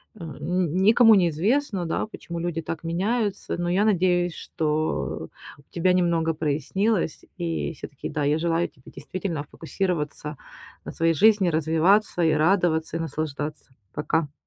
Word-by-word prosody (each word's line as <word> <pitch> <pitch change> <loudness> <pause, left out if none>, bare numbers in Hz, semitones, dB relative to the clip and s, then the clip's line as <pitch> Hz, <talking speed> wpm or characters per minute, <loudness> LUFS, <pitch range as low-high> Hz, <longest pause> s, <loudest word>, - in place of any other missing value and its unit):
м, 165 -7 -8
н 180 -3 -1
никому 225 +3 +7
неизвестно, 190 - +1
да, 165 - -2
почему 170 -5 -7
люди 165 -1 -2
так 160 +1 -6
меняются, 200 +5 -1
но 175 0 -2
я 190 +4 +2
надеюсь, 180 -3 +2
что 150 - -2 0.3
у - - -16
тебя 180 +1 +2
немного 170 -2 +2
прояснилось. 160 - -1
И 170 -1 -2
всё-таки, 140 -2 -8
да, 150 -1 -2
я 145 +2 +2
желаю 170 +1 0
тебе 130 - -17
действительно 180 -5 -4
фокусироваться 150 -2 -3 0.5
на - - -5
своей 165 0 +1
жизни, 205 +2 +4
развиваться, 165 +4 +2
и 160 - +4
радоваться, 160 0 +2
и - - -5
наслаждаться. 150 -3 -4 0.2
Пока. 150 0 -1
165 Hz, 140 wpm, -25 LUFS, 155-185 Hz, 0.5 s, никому